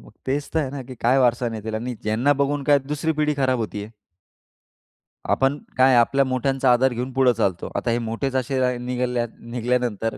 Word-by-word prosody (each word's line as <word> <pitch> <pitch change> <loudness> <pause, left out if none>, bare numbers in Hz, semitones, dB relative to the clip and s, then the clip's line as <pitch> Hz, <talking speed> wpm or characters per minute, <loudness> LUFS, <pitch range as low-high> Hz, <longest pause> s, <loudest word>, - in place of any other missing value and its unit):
मग - - -16 0.2
तेच 140 +2 -1
तर 160 - +3
आहे 135 -3 -3
ना 135 -2 -6
की 130 +1 -10
काय 125 +3 +3
वारसा 120 -1 +2
नेतील? 110 -1 -5
आणि 120 +3 -3
ज्यांना 115 +7 +2
बघून 140 0 -1
काय 145 0 +5
दुसरी 150 +4 -2
पिढी 150 -1 +1
खराब 130 -2 +2
होतीये. 105 -1 -4 1.4
आपण 135 +2 +2 0.2
काय 130 +1 +6
आहे? 130 - +5
आपल्या 135 +4 +3
मोठ्यांचा 130 0 +1
आदर 125 +1 +3
घेऊन 125 +2 -4
पुढे 130 -2 +4
चालतो. 95 -5 -1
आता 120 - -1
हे 120 - +1
मोठेच 115 +4 -3
असे 130 +1 0
राह 125 -1 +1
निघाल्या 125 -1 -1
निघल्यानंतर 120 -2 -2
125 Hz, 195 wpm, -23 LUFS, 115-135 Hz, 1.4 s, काय